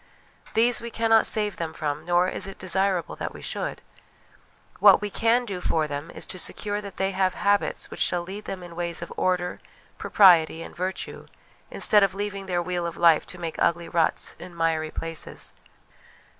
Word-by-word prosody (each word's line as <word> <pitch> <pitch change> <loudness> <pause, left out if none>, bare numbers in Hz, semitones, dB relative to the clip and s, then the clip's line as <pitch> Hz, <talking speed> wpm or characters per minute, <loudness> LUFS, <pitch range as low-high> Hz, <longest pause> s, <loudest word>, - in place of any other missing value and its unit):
These 235 +2 +3
we 235 - -5
cannot 225 -1 +3
save 210 -2 0
them 165 -1 -4
from, 150 0 -3
nor 175 +1 +3
is 190 - -2
it 195 - -9
desirable 185 -1 +1
that - - -5
we - - -10
should. - - -4 1.0
What - - +8
vve 205 -1 -5
can 235 +2 +2
do 190 -5 -5
for 160 -3 +1
them 145 +2 -5
is - - -6
to 185 - -6
secure 205 +3 -3
that 200 -1 -9
they 195 0 0
have 190 -1 0
habits 200 0 0
which - - -8
shall 175 -1 +1
lead 195 +4 -8
them 185 -2 -6
in 170 -1 -10
ways 170 0 -3
of 170 - -8
order, 180 -1 0 0.4
propriety, 165 -4 +5
and - - -11
virtue, 185 +2 -4 0.4
instead 210 - +5
of 195 -1 +2
leaving 200 -1 -4
their 175 -2 0
wheel 175 -1 -2
of 170 - -7
life 165 -2 +4
to 180 - -7
make 165 -2 -5
ugly 170 0 +1
ruts 165 -2 0
in 175 -1 -11
miry 160 -1 0
places. 165 0 -5
180 Hz, 185 wpm, -25 LUFS, 170-200 Hz, 1.0 s, What